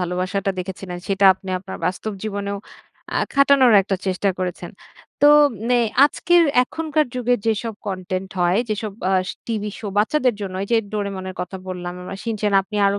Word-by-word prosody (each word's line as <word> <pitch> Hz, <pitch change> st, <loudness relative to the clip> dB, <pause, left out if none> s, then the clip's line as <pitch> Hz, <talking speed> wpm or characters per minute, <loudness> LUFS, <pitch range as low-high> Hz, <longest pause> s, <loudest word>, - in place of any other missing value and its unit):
ভালোবাসাটা 185 Hz, +2 st, -1 dB
দেখেছিলেন 185 Hz, -1 st, -6 dB
সেটা 195 Hz, 0 st, +1 dB
আপনি 190 Hz, 0 st, -13 dB
আপনার 190 Hz, +1 st, -8 dB
বাস্তব 195 Hz, +4 st, -3 dB
জীবনেও 200 Hz, -1 st, -3 dB, 0.6 s
আ -, -, +2 dB, 0.2 s
খাটানোর 275 Hz, -3 st, +5 dB
একটা 195 Hz, 0 st, -2 dB
চেষ্টা 190 Hz, +1 st, 0 dB
করেছেন। 180 Hz, -1 st, -4 dB, 0.5 s
তো -, -, +8 dB, 0.5 s
এ -, -, +4 dB, 0.3 s
আজকের 345 Hz, +4 st, +3 dB, 0.2 s
এখনকার 310 Hz, +2 st, -1 dB
যুগে 245 Hz, 0 st, +1 dB
যেসব 225 Hz, 0 st, -1 dB
কনটেন্ট 185 Hz, 0 st, -4 dB
হয় 175 Hz, +3 st, +3 dB
যেসব 215 Hz, -1 st, -3 dB, 0.2 s
আ -, -, +2 dB, 0.3 s
টিভি 210 Hz, -2 st, -2 dB
শো 225 Hz, -, -7 dB
বাচ্চাদের 250 Hz, +2 st, +2 dB
জন্য 195 Hz, -2 st, -5 dB
এই 200 Hz, -, -5 dB
যে -, -, +5 dB, 0.2 s
'Doraemon' 200 Hz, -3 st, -3 dB
এর 185 Hz, -, -10 dB
কথা 180 Hz, +2 st, -5 dB
বললাম 180 Hz, -1 st, -5 dB, 0.2 s
বা -, -, -5 dB
'Shin-chan' 210 Hz, -3 st, 0 dB
আপনি 210 Hz, +2 st, -7 dB
আরো 200 Hz, 0 st, +1 dB
200 Hz, 165 wpm, -21 LUFS, 185-225 Hz, 0.6 s, তো